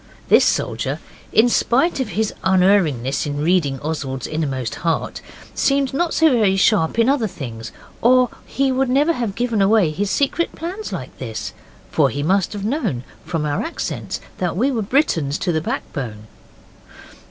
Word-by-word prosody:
This - - +6
soldier, - - 0 0.3
in 225 +2 +5
spite 270 +7 +2
of 255 -5 -1
his 220 -1 0
unerringness 180 -9 +2
in 145 0 -3
reading 155 -6 +1
Oswald's 140 -5 -3
innermost 135 -6 -2
heart, 165 -1 -1 0.3
seemed 275 -1 +1
not 335 +4 0
so 320 -1 +4
very 215 -6 +3
sharp 195 -2 +2
in 230 0 +4
other 270 -5 +2
things, 115 - -7 0.3
or 250 +1 +5 0.2
he 270 0 0
would 260 0 +1
never 290 +6 +3
have 230 -8 -3
given 235 -2 0
away 195 -4 +4
his 195 +6 -2
secret 285 +8 0
plans 370 +6 -5
like 145 -9 -6
this, 115 -4 -5 0.4
for - - +3
he 145 - -3
must 190 +3 +2
have 205 -1 -5
known 220 - -1 0.2
from 160 -3 -2
our 150 +6 -1
accents 330 - -4 0.2
that 180 -1 -1
we 260 +7 +2
were 235 -4 -1
Britons 185 - +1
to 180 - -1
the 160 -1 0
backbone. 110 -8 -5
195 Hz, 165 wpm, -20 LUFS, 150-255 Hz, 0.4 s, This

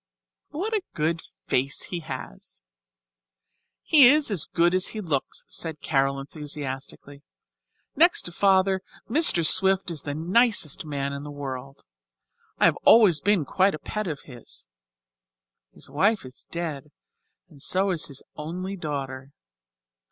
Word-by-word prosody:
What 405 +9 -4
a 430 - +1
good 160 +1 -1 0.2
face 135 +2 -1
he 175 - -2
has!" - - -9 1.2
"He 285 -6 +7
is 295 -3 +3
as 185 -8 +4
good 170 +1 +1
as 185 0 +2
he - - -3
looks," 155 -9 -3
said 160 -3 -4
Carol, 135 -1 0
enthusiastically. 140 -1 -7 0.7
"Next 340 +5 +4
to 175 - -6
Father, 190 0 +2 0.3
Mr. 230 - +5
Swift 190 +1 +3
is 155 -4 -4
the 145 -1 -5
nicest 180 - +1
man 140 -2 -3
in 140 - -6
the 150 - -8
world. 135 -1 -8 0.7
I - - +3
have - - +3
always 195 -10 +5
been 200 -5 +2
quite 190 +6 +2
a - - -6
pet 210 +6 -4
of 150 -4 -5
his. 120 - -12 1.0
His - - -8
wife 200 +4 +1
is 130 - -11
dead, 165 -5 -5 0.6
and 145 -3 -15
so 190 +5 +2
is 170 -4 -2
his 140 -2 -7
only 180 +6 -5
daughter. 140 -5 -6
160 Hz, 140 wpm, -25 LUFS, 140-195 Hz, 1.2 s, He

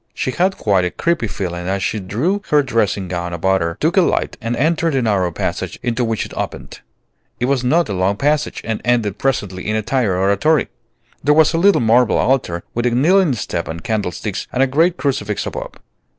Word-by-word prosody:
She 130 - -2
had 190 +7 0
quite 100 -4 +2
a 90 - 0
creepy 170 - -1
feeling 90 -3 -4
as 95 +1 -1
she 110 - -1
drew 125 - -1
her 150 -1 +4
dressing 110 -6 0
gown 85 -1 -4
about 95 +3 +1
her, 85 0 -2
took - - +1
a - - +7
light, - - 0
and 115 +2 -2
entered 160 +4 +1
the 135 - +1
narrow 95 -5 +1
passage - - -3
into 120 0 0
which 115 -2 -1
it - - -11
opened. - - -6 0.6
It 120 - 0
was 130 -1 +1
not 165 +7 +2
a - - -3
long 95 +2 +1
passage, 150 +3 0
and 110 -1 -3
ended 115 -4 0
presently 100 -9 -2
in 110 - 0
a 110 - -1
tiny 125 +1 0
oratory. 100 - +2 0.5
There 150 +1 +4
was 155 -1 +4
a 165 - +1
little 200 -2 +4
marble 115 +1 +3
altar, 105 -10 0
with 120 +1 0
a - - +3
kneeling 160 +6 +3
step 90 -6 -3
and 80 +1 -6
candlesticks 105 -2 -3
and 130 - +2
a - - +5
great 165 +7 +2
crucifix 105 -7 -2
above. - - -6
115 Hz, 210 wpm, -18 LUFS, 95-140 Hz, 0.6 s, a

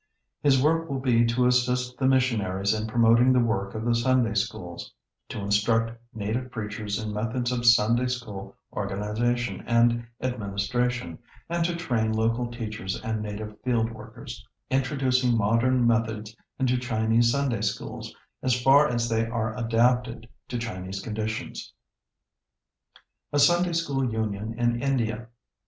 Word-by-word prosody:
His 140 -3 +4
work 165 +4 +2
will 135 - -1
be 120 -3 +3
to 120 +2 +2
assist 125 0 +1
the 130 - +2
missionaries 110 -7 +1
in 110 0 -2
promoting 115 +2 +4
the 130 - +4
work 105 -4 -1
of 110 +1 -4
the 120 - +2
Sunday 120 -1 +2
Schools, - - -3 0.4
to - - -5
instruct 110 +3 +2 0.2
native 110 +4 -3
preachers 105 -3 -4
in 110 -1 -4
methods 115 +4 -1
of 120 -1 -1
Sunday 120 +2 +5
School 120 -6 -5 0.2
organization 105 +5 -2
and 120 0 +3
administration, 120 -3 -2 0.3
and 170 0 0
to 170 0 -1
train 120 -10 0
local 115 +2 0
teachers 110 -5 -5
and 110 -1 -2
native 105 0 -6
field 115 -3 +1
workers, 115 +1 -10 0.3
introducing 130 -2 +2
modern 115 +4 +2
methods 110 -2 0 0.2
into 125 -2 +1
Chinese 115 -1 +2
Sunday 130 -5 0
Schools 105 -2 -4 0.3
as 125 -1 +1
far 140 +4 +6
as 120 -2 0
they 115 0 0
are 110 -1 -2
adapted 120 0 +1 0.2
to 125 - -3
Chinese 95 -4 -5
conditions. 110 +1 -5 1.2
[Sidenote: - - -23 0.3
A - - +2
Sunday 175 +4 +4
School 140 -7 0
Union 110 0 -3
in 120 0 +1
India. 120 -4 -1
115 Hz, 140 wpm, -26 LUFS, 110-125 Hz, 1.2 s, far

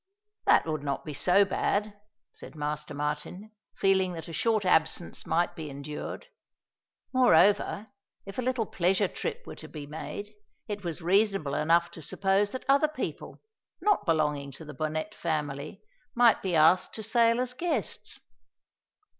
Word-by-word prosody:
"That - - +5
would 155 -2 -2
not 140 -1 -3
be 150 - -5
so 190 +7 +4
bad," 205 +2 -1 0.4
said - - -11
Master 150 0 -4
Martin, 150 +8 -4 0.2
feeling 190 -2 +2
that 165 -2 -7
a 165 - -8
short 215 +4 +1
absence 165 -1 +1
might 175 +1 +1
be 160 -3 -6
endured. 140 +2 -6 0.9
Moreover, 205 -3 +4 0.4
if 195 +4 -7
a - - +1
little 250 -2 0
pleasure 190 +2 +1
trip 475 - -5
were - - -8
to - - -10
be 150 -2 -8
made, 205 +7 -7 0.3
it 205 -2 -5
was 170 -1 -5
reasonable 195 -5 +2
enough 165 +4 +2
to 165 - -10
suppose 195 +6 +1
that 260 - -6
other 280 +3 +5
people, 305 - -6 0.4
not 415 - +1
belonging 150 -3 +1
to 160 - -11
the 150 - -8
Bonnet 155 +7 -3
family, 155 0 -3 0.3
might 240 -1 +5
be 185 -3 -1
asked 160 +4 +4
to 220 - -5
sail 230 +1 +3
as 250 0 -1
guests. 295 - -3
180 Hz, 155 wpm, -28 LUFS, 155-215 Hz, 0.9 s, That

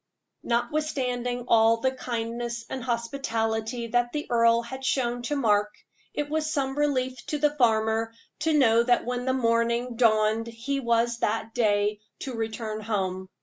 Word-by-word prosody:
Notwithstanding 245 -1 -1
all 225 0 +5
the 260 +3 +1
kindness 235 -1 -4
and 260 - -4
hospitality 235 -2 -2
that 240 +1 +1
the 300 0 -2
earl 230 0 +4
had 265 +3 -8
shown 245 -2 0
to 295 - 0
Mark, 210 -6 +2 0.4
it 295 - -1
was 310 +1 -1
some 270 -3 -1
relief 260 -4 0
to 300 - -1
the 295 0 +2
farmer 225 -3 +2 0.3
to 320 +1 +1
know 230 -4 +5
that 245 0 +2
when 245 0 -2
morning 235 -1 +1
dawned 220 -1 +3
he 235 +5 -3
was 235 -1 +1
that 225 +1 -1
day 210 -2 +1 0.2
to 265 - -4
return 220 -1 -4
home. 190 -3 -2
235 Hz, 150 wpm, -26 LUFS, 225-260 Hz, 0.4 s, all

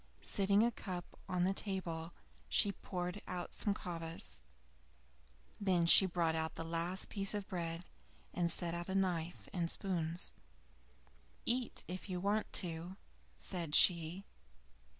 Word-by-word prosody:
Setting 200 +1 +3
a 235 - +3
cup 180 -5 -6
on 180 -1 +1
the 190 +2 +2
table, 175 -5 -3 0.4
she 205 - +4
poured 180 0 -4
out 180 -1 -4
some 205 -2 -1
kvas. 165 - -2 1.2
Then 185 -4 +2
she 190 +3 +8
brought 170 -2 +1
out 160 0 -1
the - - -4
last 170 +3 -3
piece 200 0 +2
of 205 -2 -4
bread, 170 -1 -3 0.5
and 175 -1 +1
set 170 0 +1
out 170 +1 -4
a 190 - -1
knife 175 -3 -1
and 170 -2 0
spoons. 170 -3 +2 1.1
"Eat, 245 0 -1
if 185 +2 -6
you 180 -1 -2
want 205 +3 0
to," 175 +1 -1 0.4
said 170 -5 -3
she. 175 +2 +5
180 Hz, 135 wpm, -36 LUFS, 170-195 Hz, 1.2 s, she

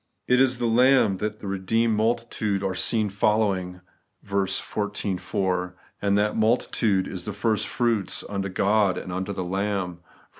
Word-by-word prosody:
It 125 +1 +4
is 130 -1 +3
the 120 - -1
Larrib 115 -4 +4
that 105 0 -3
the - - -8
redeemed 110 +4 +1
multitude 110 -3 -1
are 95 -1 -1
seen 110 +3 +1
following 100 -3 0 0.4
(xiv. 100 0 -1
4); 90 -3 -2 0.3
and 100 0 +2
that 105 +1 +1
multitude 110 -3 +1
is 90 -2 -6
the 105 - -4
first 110 +1 0
fruits 115 -5 0
unto 100 -1 -3
God 100 +1 +2
and 90 - -6
unto 95 +2 -3
the 95 -2 -4
Lamb 95 -1 -2
(xiv. 90 +1 -28
100 Hz, 155 wpm, -25 LUFS, 95-110 Hz, 0.4 s, It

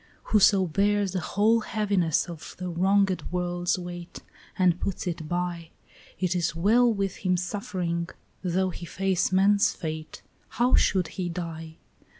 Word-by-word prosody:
"Whoso 200 -2 +5
bears 200 +3 +1
the 185 - -1
whole 215 +6 +2
heaviness 200 -8 0
of 170 -3 -9
the 180 0 -4
wronged 190 +1 +2
world's 175 0 -1
weight 175 -1 -8 0.3
And 180 -2 +3
puts 195 - -3
it 165 -3 -4
by, 175 -2 -3 0.5
It 185 -1 0
is 170 -1 0
well 230 +8 +4
with 195 -3 -2
him 185 -2 0
suffering, 180 -3 -3 0.3
though 185 +1 0
he 170 0 -8
face 190 0 0
man's 200 +2 +4
fate; 155 -2 -6 0.3
How 245 +2 +2
should 185 -4 +3
he 180 0 -4
die? 165 -2 -6
180 Hz, 145 wpm, -26 LUFS, 170-195 Hz, 0.5 s, Whoso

